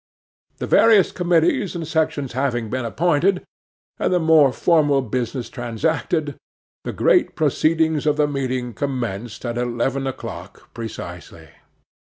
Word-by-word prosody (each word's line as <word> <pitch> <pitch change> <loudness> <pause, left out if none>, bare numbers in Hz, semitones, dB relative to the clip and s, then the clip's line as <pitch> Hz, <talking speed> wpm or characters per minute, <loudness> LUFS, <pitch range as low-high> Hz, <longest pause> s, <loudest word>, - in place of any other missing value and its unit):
The - - -4
various 220 -4 +5
committees 180 - +1
and 165 -2 -4
sections 155 -5 -1
having 120 -4 -1
been 130 -1 -2
appointed, 175 - +1 0.6
and - - 0
the 180 - +3
more 160 -4 +5
formal 145 -2 +2
business 125 0 -3
transacted, 145 +5 -2 0.5
the - - -4
great - - +2
proceedings 160 0 +1
of 150 0 +2
the 150 -1 +3
meeting 130 -4 -3
commenced 120 -3 -4
at 120 0 -2
eleven 125 +3 -1
o'clock 135 - -8
precisely. 115 -2 -8
140 Hz, 125 wpm, -21 LUFS, 120-160 Hz, 0.6 s, various